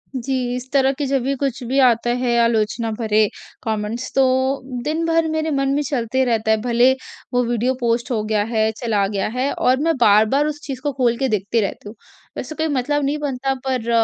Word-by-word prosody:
जी 265 +1 -2 0.2
इस 250 +1 -7
तरह 270 -1 +3
की 285 +1 -3
जब 270 -1 0
भी 270 +2 0
कुछ 270 -2 -3
भी 265 +3 +1
आता 240 -1 +2
है 240 -1 +2
आलोचना 230 0 +1
भरे 215 -2 +3 0.4
कमेंट्स 220 +3 -3
तो 270 - +4 0.6
दिन 315 +4 -1
भर 330 0 +2
मेरे 315 0 -1
मन 275 -1 0
में 295 - +1
चलते 260 -3 0
रहता 225 -2 +1
है 220 - +4
भले 240 +2 +4 0.4
वो 245 0 +3
वीडियो 240 +2 0
पोस्ट 235 0 0
हो 220 -3 0
गया 215 -1 0
है, 220 0 0
चला 220 -3 0
गया 195 -1 -2
है, 255 +5 -1
और 255 +1 +2
मैं 325 +2 +1
बार-बार 220 +5 +4
उस 300 -1 -4
चीज़ 265 -3 -6
को 290 - -1
खोल 245 -3 +1
के 270 - 0
देखती 210 +2 0
रहती 205 0 -4
हूँ। 215 - -11 0.4
वैसे 310 - -5
कोई 320 +1 -1
मतलब 290 +1 0
नहीं 285 +2 0
बनता 270 -2 -2
पर 250 -3 -1
250 Hz, 210 wpm, -20 LUFS, 225-275 Hz, 0.6 s, तो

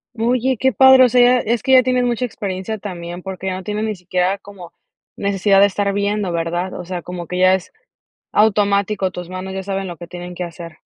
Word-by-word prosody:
Oye, 250 +2 0
qué 265 -1 +2
padre, 265 +3 +7
o 250 - +5
sea, 250 +1 +4
ya 245 +1 +5
es 230 0 -1
que 265 +2 +1
ya 255 -1 +7
tienes 250 0 +1
mucha 245 0 0
experiencia 200 -1 -5
también, 175 -3 -7
porque 190 0 -6
ya 185 - -1
no 185 - -7
tienes 210 +2 -3
ni 215 -1 -2
siquiera 180 +1 -1
como 195 -4 -13 0.4
necesidad 200 0 +2
de 200 - +7
estar 200 0 -1
viendo, 200 -1 -1
¿verdad?, 170 +2 -2
o - - -7
sea, 180 0 -5
como 175 0 -7
que 180 - -4
ya 185 0 +5
es 190 -1 -3 0.6
automático, 200 -2 +2
tus 180 -1 -8
manos 185 +1 -6
ya 190 0 -4
saben 195 0 -3
lo 175 -2 -7
que 175 - -10
tienen 180 0 -8
que 180 - -4
hacer. 170 -1 -10
195 Hz, 225 wpm, -19 LUFS, 180-215 Hz, 0.6 s, padre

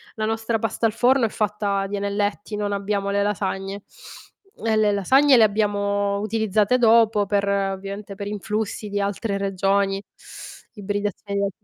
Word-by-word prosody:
La 215 -1 -2
nostra 225 +1 -1
pasta 225 +1 0
al - - -2
forno 250 +1 +3
è - - -1
fatta 205 -2 -1
di 200 +1 -4
anelletti, 205 +1 -2
non 205 -1 -2
abbiamo 200 0 -1
le 200 0 +1
lasagne. 195 0 -2 0.8
E 220 -1 +2
le 215 -1 +3
lasagne 260 +7 +4
le 225 - +7
abbiamo 200 -1 +1
utilizzate 215 +2 +1
dopo 225 -3 +4
per 200 -1 0
ovviamente 195 +1 -3
per 200 +1 -6
influssi 210 +1 -3
di 205 - -2
altre 200 +1 -2
regioni, 195 0 0 0.7
ibridazione 205 -1 -2
205 Hz, 145 wpm, -23 LUFS, 200-215 Hz, 0.8 s, le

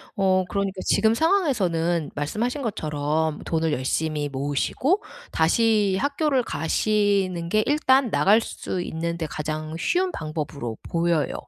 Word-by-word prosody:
어 190 -1 +2
그러니까 195 -1 -2
지금 220 +2 +3
상황에서는 190 - +1
말씀하신 225 - -2
것처럼 155 - -1
돈을 160 -1 0
열심히 150 +3 -1
모으시고 145 - 0 0.3
다시 205 +3 +2
학교를 285 -1 +1
가시는 195 -1 0
게 215 +4 +2
일단 270 -4 +3
나갈 210 +4 +4
수 190 - -5
있는데 170 0 -3
가장 155 +1 -4
쉬운 365 - +1
방법으로 150 - -5
보여요. 170 -2 0
175 Hz, 295 characters per minute, -24 LUFS, 155-225 Hz, 0.3 s, 나갈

